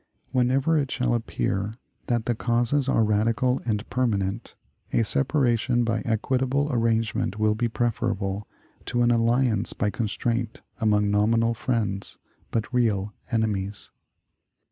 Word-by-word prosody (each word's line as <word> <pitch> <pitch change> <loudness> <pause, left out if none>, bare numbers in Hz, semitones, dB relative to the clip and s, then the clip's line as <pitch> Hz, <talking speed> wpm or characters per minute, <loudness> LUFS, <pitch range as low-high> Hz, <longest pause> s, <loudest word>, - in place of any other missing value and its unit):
Whenever 135 +5 +2
it 140 -2 -1
shall 125 -1 0
appear 110 -3 -2 0.3
that 120 -2 0
the 120 - +1
causes 120 +4 +1
are 115 - +3
radical 115 +4 +1
and 105 -1 -1
permanent, 110 -4 -1 0.4
a 115 - +3
separation 120 -2 +1
by 115 -1 0
equitable 130 +5 0
arrangement 115 -4 0
will 110 0 +2
be 120 +2 0
preferable 105 -4 -1 0.4
to 120 0 0
an 120 - +4
alliance 115 -1 +2
by 105 - -1
constraint 115 +1 -2 0.2
among 105 -2 +2
nominal 115 +3 +3
friends, 110 -5 -2 0.3
but 115 +2 -2
real 105 -5 +1 0.2
enemies." 105 -4 -2
115 Hz, 120 wpm, -25 LUFS, 105-125 Hz, 0.4 s, an